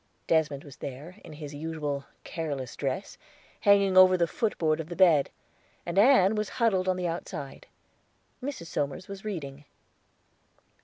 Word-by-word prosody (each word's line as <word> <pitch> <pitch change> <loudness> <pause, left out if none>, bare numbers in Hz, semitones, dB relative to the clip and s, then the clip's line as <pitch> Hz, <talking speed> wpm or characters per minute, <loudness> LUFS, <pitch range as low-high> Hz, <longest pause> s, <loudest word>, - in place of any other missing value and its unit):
Desmond 150 -4 +1
was 140 -3 -13
there, 145 +8 -8
in 155 - -11
his 150 -1 -8
usual 145 -2 -4 0.2
careless 140 -7 -4
dress, 135 +6 -4 0.4
hanging 200 -2 +4
over 185 0 +8
the 170 - +3
footboard 165 -4 0
of 160 0 -5
the 175 - -5
bed, 165 -6 +5 0.6
and 175 +3 0
Ann 215 -4 +6
was 210 -1 -2
huddled 200 -6 +2
on 185 - +2
the 180 -1 -1
outside. 150 -4 -6 0.7
Mrs. 270 -9 -5
Somers 150 +3 -3
was 195 -1 -8
reading. 145 -9 -6
165 Hz, 145 wpm, -28 LUFS, 145-190 Hz, 0.7 s, over